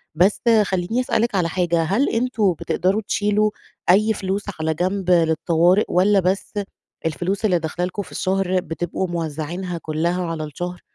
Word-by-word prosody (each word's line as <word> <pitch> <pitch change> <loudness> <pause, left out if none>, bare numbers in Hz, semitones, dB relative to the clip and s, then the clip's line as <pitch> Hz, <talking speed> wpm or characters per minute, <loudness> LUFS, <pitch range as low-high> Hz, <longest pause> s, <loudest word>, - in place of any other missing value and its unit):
بس 185 +5 +3 0.2
خلّيني 190 +5 -1
أسألِك 235 -3 0
على 175 -3 +1
حاجة، 170 -1 +1
هل 200 - +1
أنتم 225 -5 +1
بتقدروا 190 +5 0
تشيلوا 210 0 +1 0.4
أي 215 +4 +5
فلوس 195 0 -2 0.2
على 160 0 0
جنب 185 +3 -1
للطوارئ، 170 +3 +3
والّا 195 +3 +4
بس 190 +4 -1 0.5
الفلوس 175 +7 -1
اللي 180 -5 +3
داخلة 165 +3 -2
لكم 185 +3 -4
في 185 - -11
الشهر 185 -1 0
بتبقوا 175 +2 -3
موزعينها 170 +2 -4
كلّها 170 +3 -1
على 165 -2 -3
الشهر 175 +4 -6
180 Hz, 150 wpm, -21 LUFS, 170-200 Hz, 0.5 s, أي